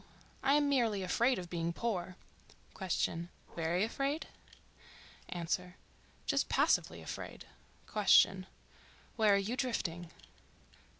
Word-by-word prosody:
I 275 +1 +4
am 295 -1 +3
merely 230 -8 +2
afraid 235 +8 +2
of 180 - -5
being 170 -1 -2
poor. 185 -4 -2 0.6
Q.—Very 170 -1 -2
afraid? 275 +7 -1 1.1
A.—Just 180 +1 -3
passively - - +2
afraid. - - -7 0.5
Q.—Where 200 +1 +2
are - - +4
you 200 +5 -1
drifting? 175 -10 -2
195 Hz, 85 wpm, -34 LUFS, 175-235 Hz, 1.1 s, I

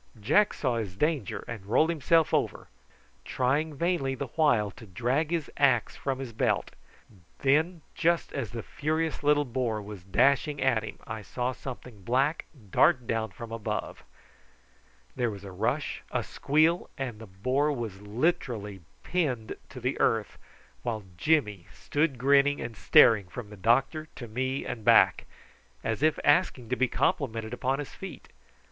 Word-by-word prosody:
Jack 205 - +3
saw 125 -4 0
his 100 -5 -4
danger 150 - -1
and 115 -5 -6
rolled 155 +10 +3
himself 165 0 +2
over, - - -1 0.5
trying 145 +5 0
vainly 140 -4 0
the 135 -1 -5
while 120 -9 +2
to 110 - -13
drag 125 - 0
his 165 -3 -1
axe 130 -6 +3
from 135 -2 -2
his 130 -3 -6
belt. - - 0 0.7
Then 155 +4 +2
just 170 0 +1
as 130 -7 -3
the 115 -2 -6
furious 155 +2 -2
little 145 0 +3
boar 120 -3 -1
was 100 -3 -9
dashing 140 - +2
at 125 -5 +2
him, 110 - -8
I 110 0 -5
saw 125 +4 -2
something 125 -4 -9
black 135 - +1 0.3
dart 130 -2 +4
down 110 -1 -1
from 115 +4 -9
above; 110 -2 -4 1.1
there 120 -1 0
was 100 -2 -8
a 100 - -8
rush, 115 +10 -2
a - - -1
squeal, 155 +4 +1
and 125 -5 -4
the 110 - -10
boar 130 +10 0
was 115 -8 -5
literally 110 - -1 0.2
pinned 130 -11 -1
to 130 - -9
the 125 +2 -2
earth, 110 -2 +1 0.4
while 110 -3 -3
Jimmy 105 - +1
stood 145 -2 0
grinning 140 +2 +4
and 115 -1 -5
staring 105 -1 +5
from 105 +2 -8
the - - -9
doctor 130 - +1
to 120 - -7
me 130 +4 -2
and 115 - -5
back, - - +5 0.6
as 115 +3 -2
if 155 0 +3
asking 145 -6 +2
to 125 - +1
be 130 0 +2
complimented 115 -4 -1
upon 130 +2 0
his 145 -1 -6
feat. - - -9
125 Hz, 155 wpm, -28 LUFS, 110-145 Hz, 1.1 s, staring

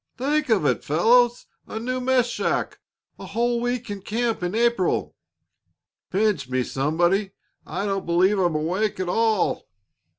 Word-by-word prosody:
"Think 290 +3 0
of 205 -9 +2
it, - - +1
fellows! 240 +10 +3 0.2
A 220 - -5
new 255 +3 -2
mess 255 -1 +3
shack! 240 - -2 0.4
A - - -8
whole 235 +4 0
week 245 -2 -2
in 200 -1 -6
camp 225 +2 -2
in 180 +3 -2
April!" 235 -5 +1 0.9
"Pinch 190 -9 0
me, 130 0 0
somebody; 175 - 0 0.3
I 200 - -3
don't 195 -2 -2
believe 185 +4 +3
I'm 175 -4 +1
awake 185 +7 -1
at 185 - -2
all!" 220 0 +1
210 Hz, 145 wpm, -24 LUFS, 180-235 Hz, 0.9 s, fellows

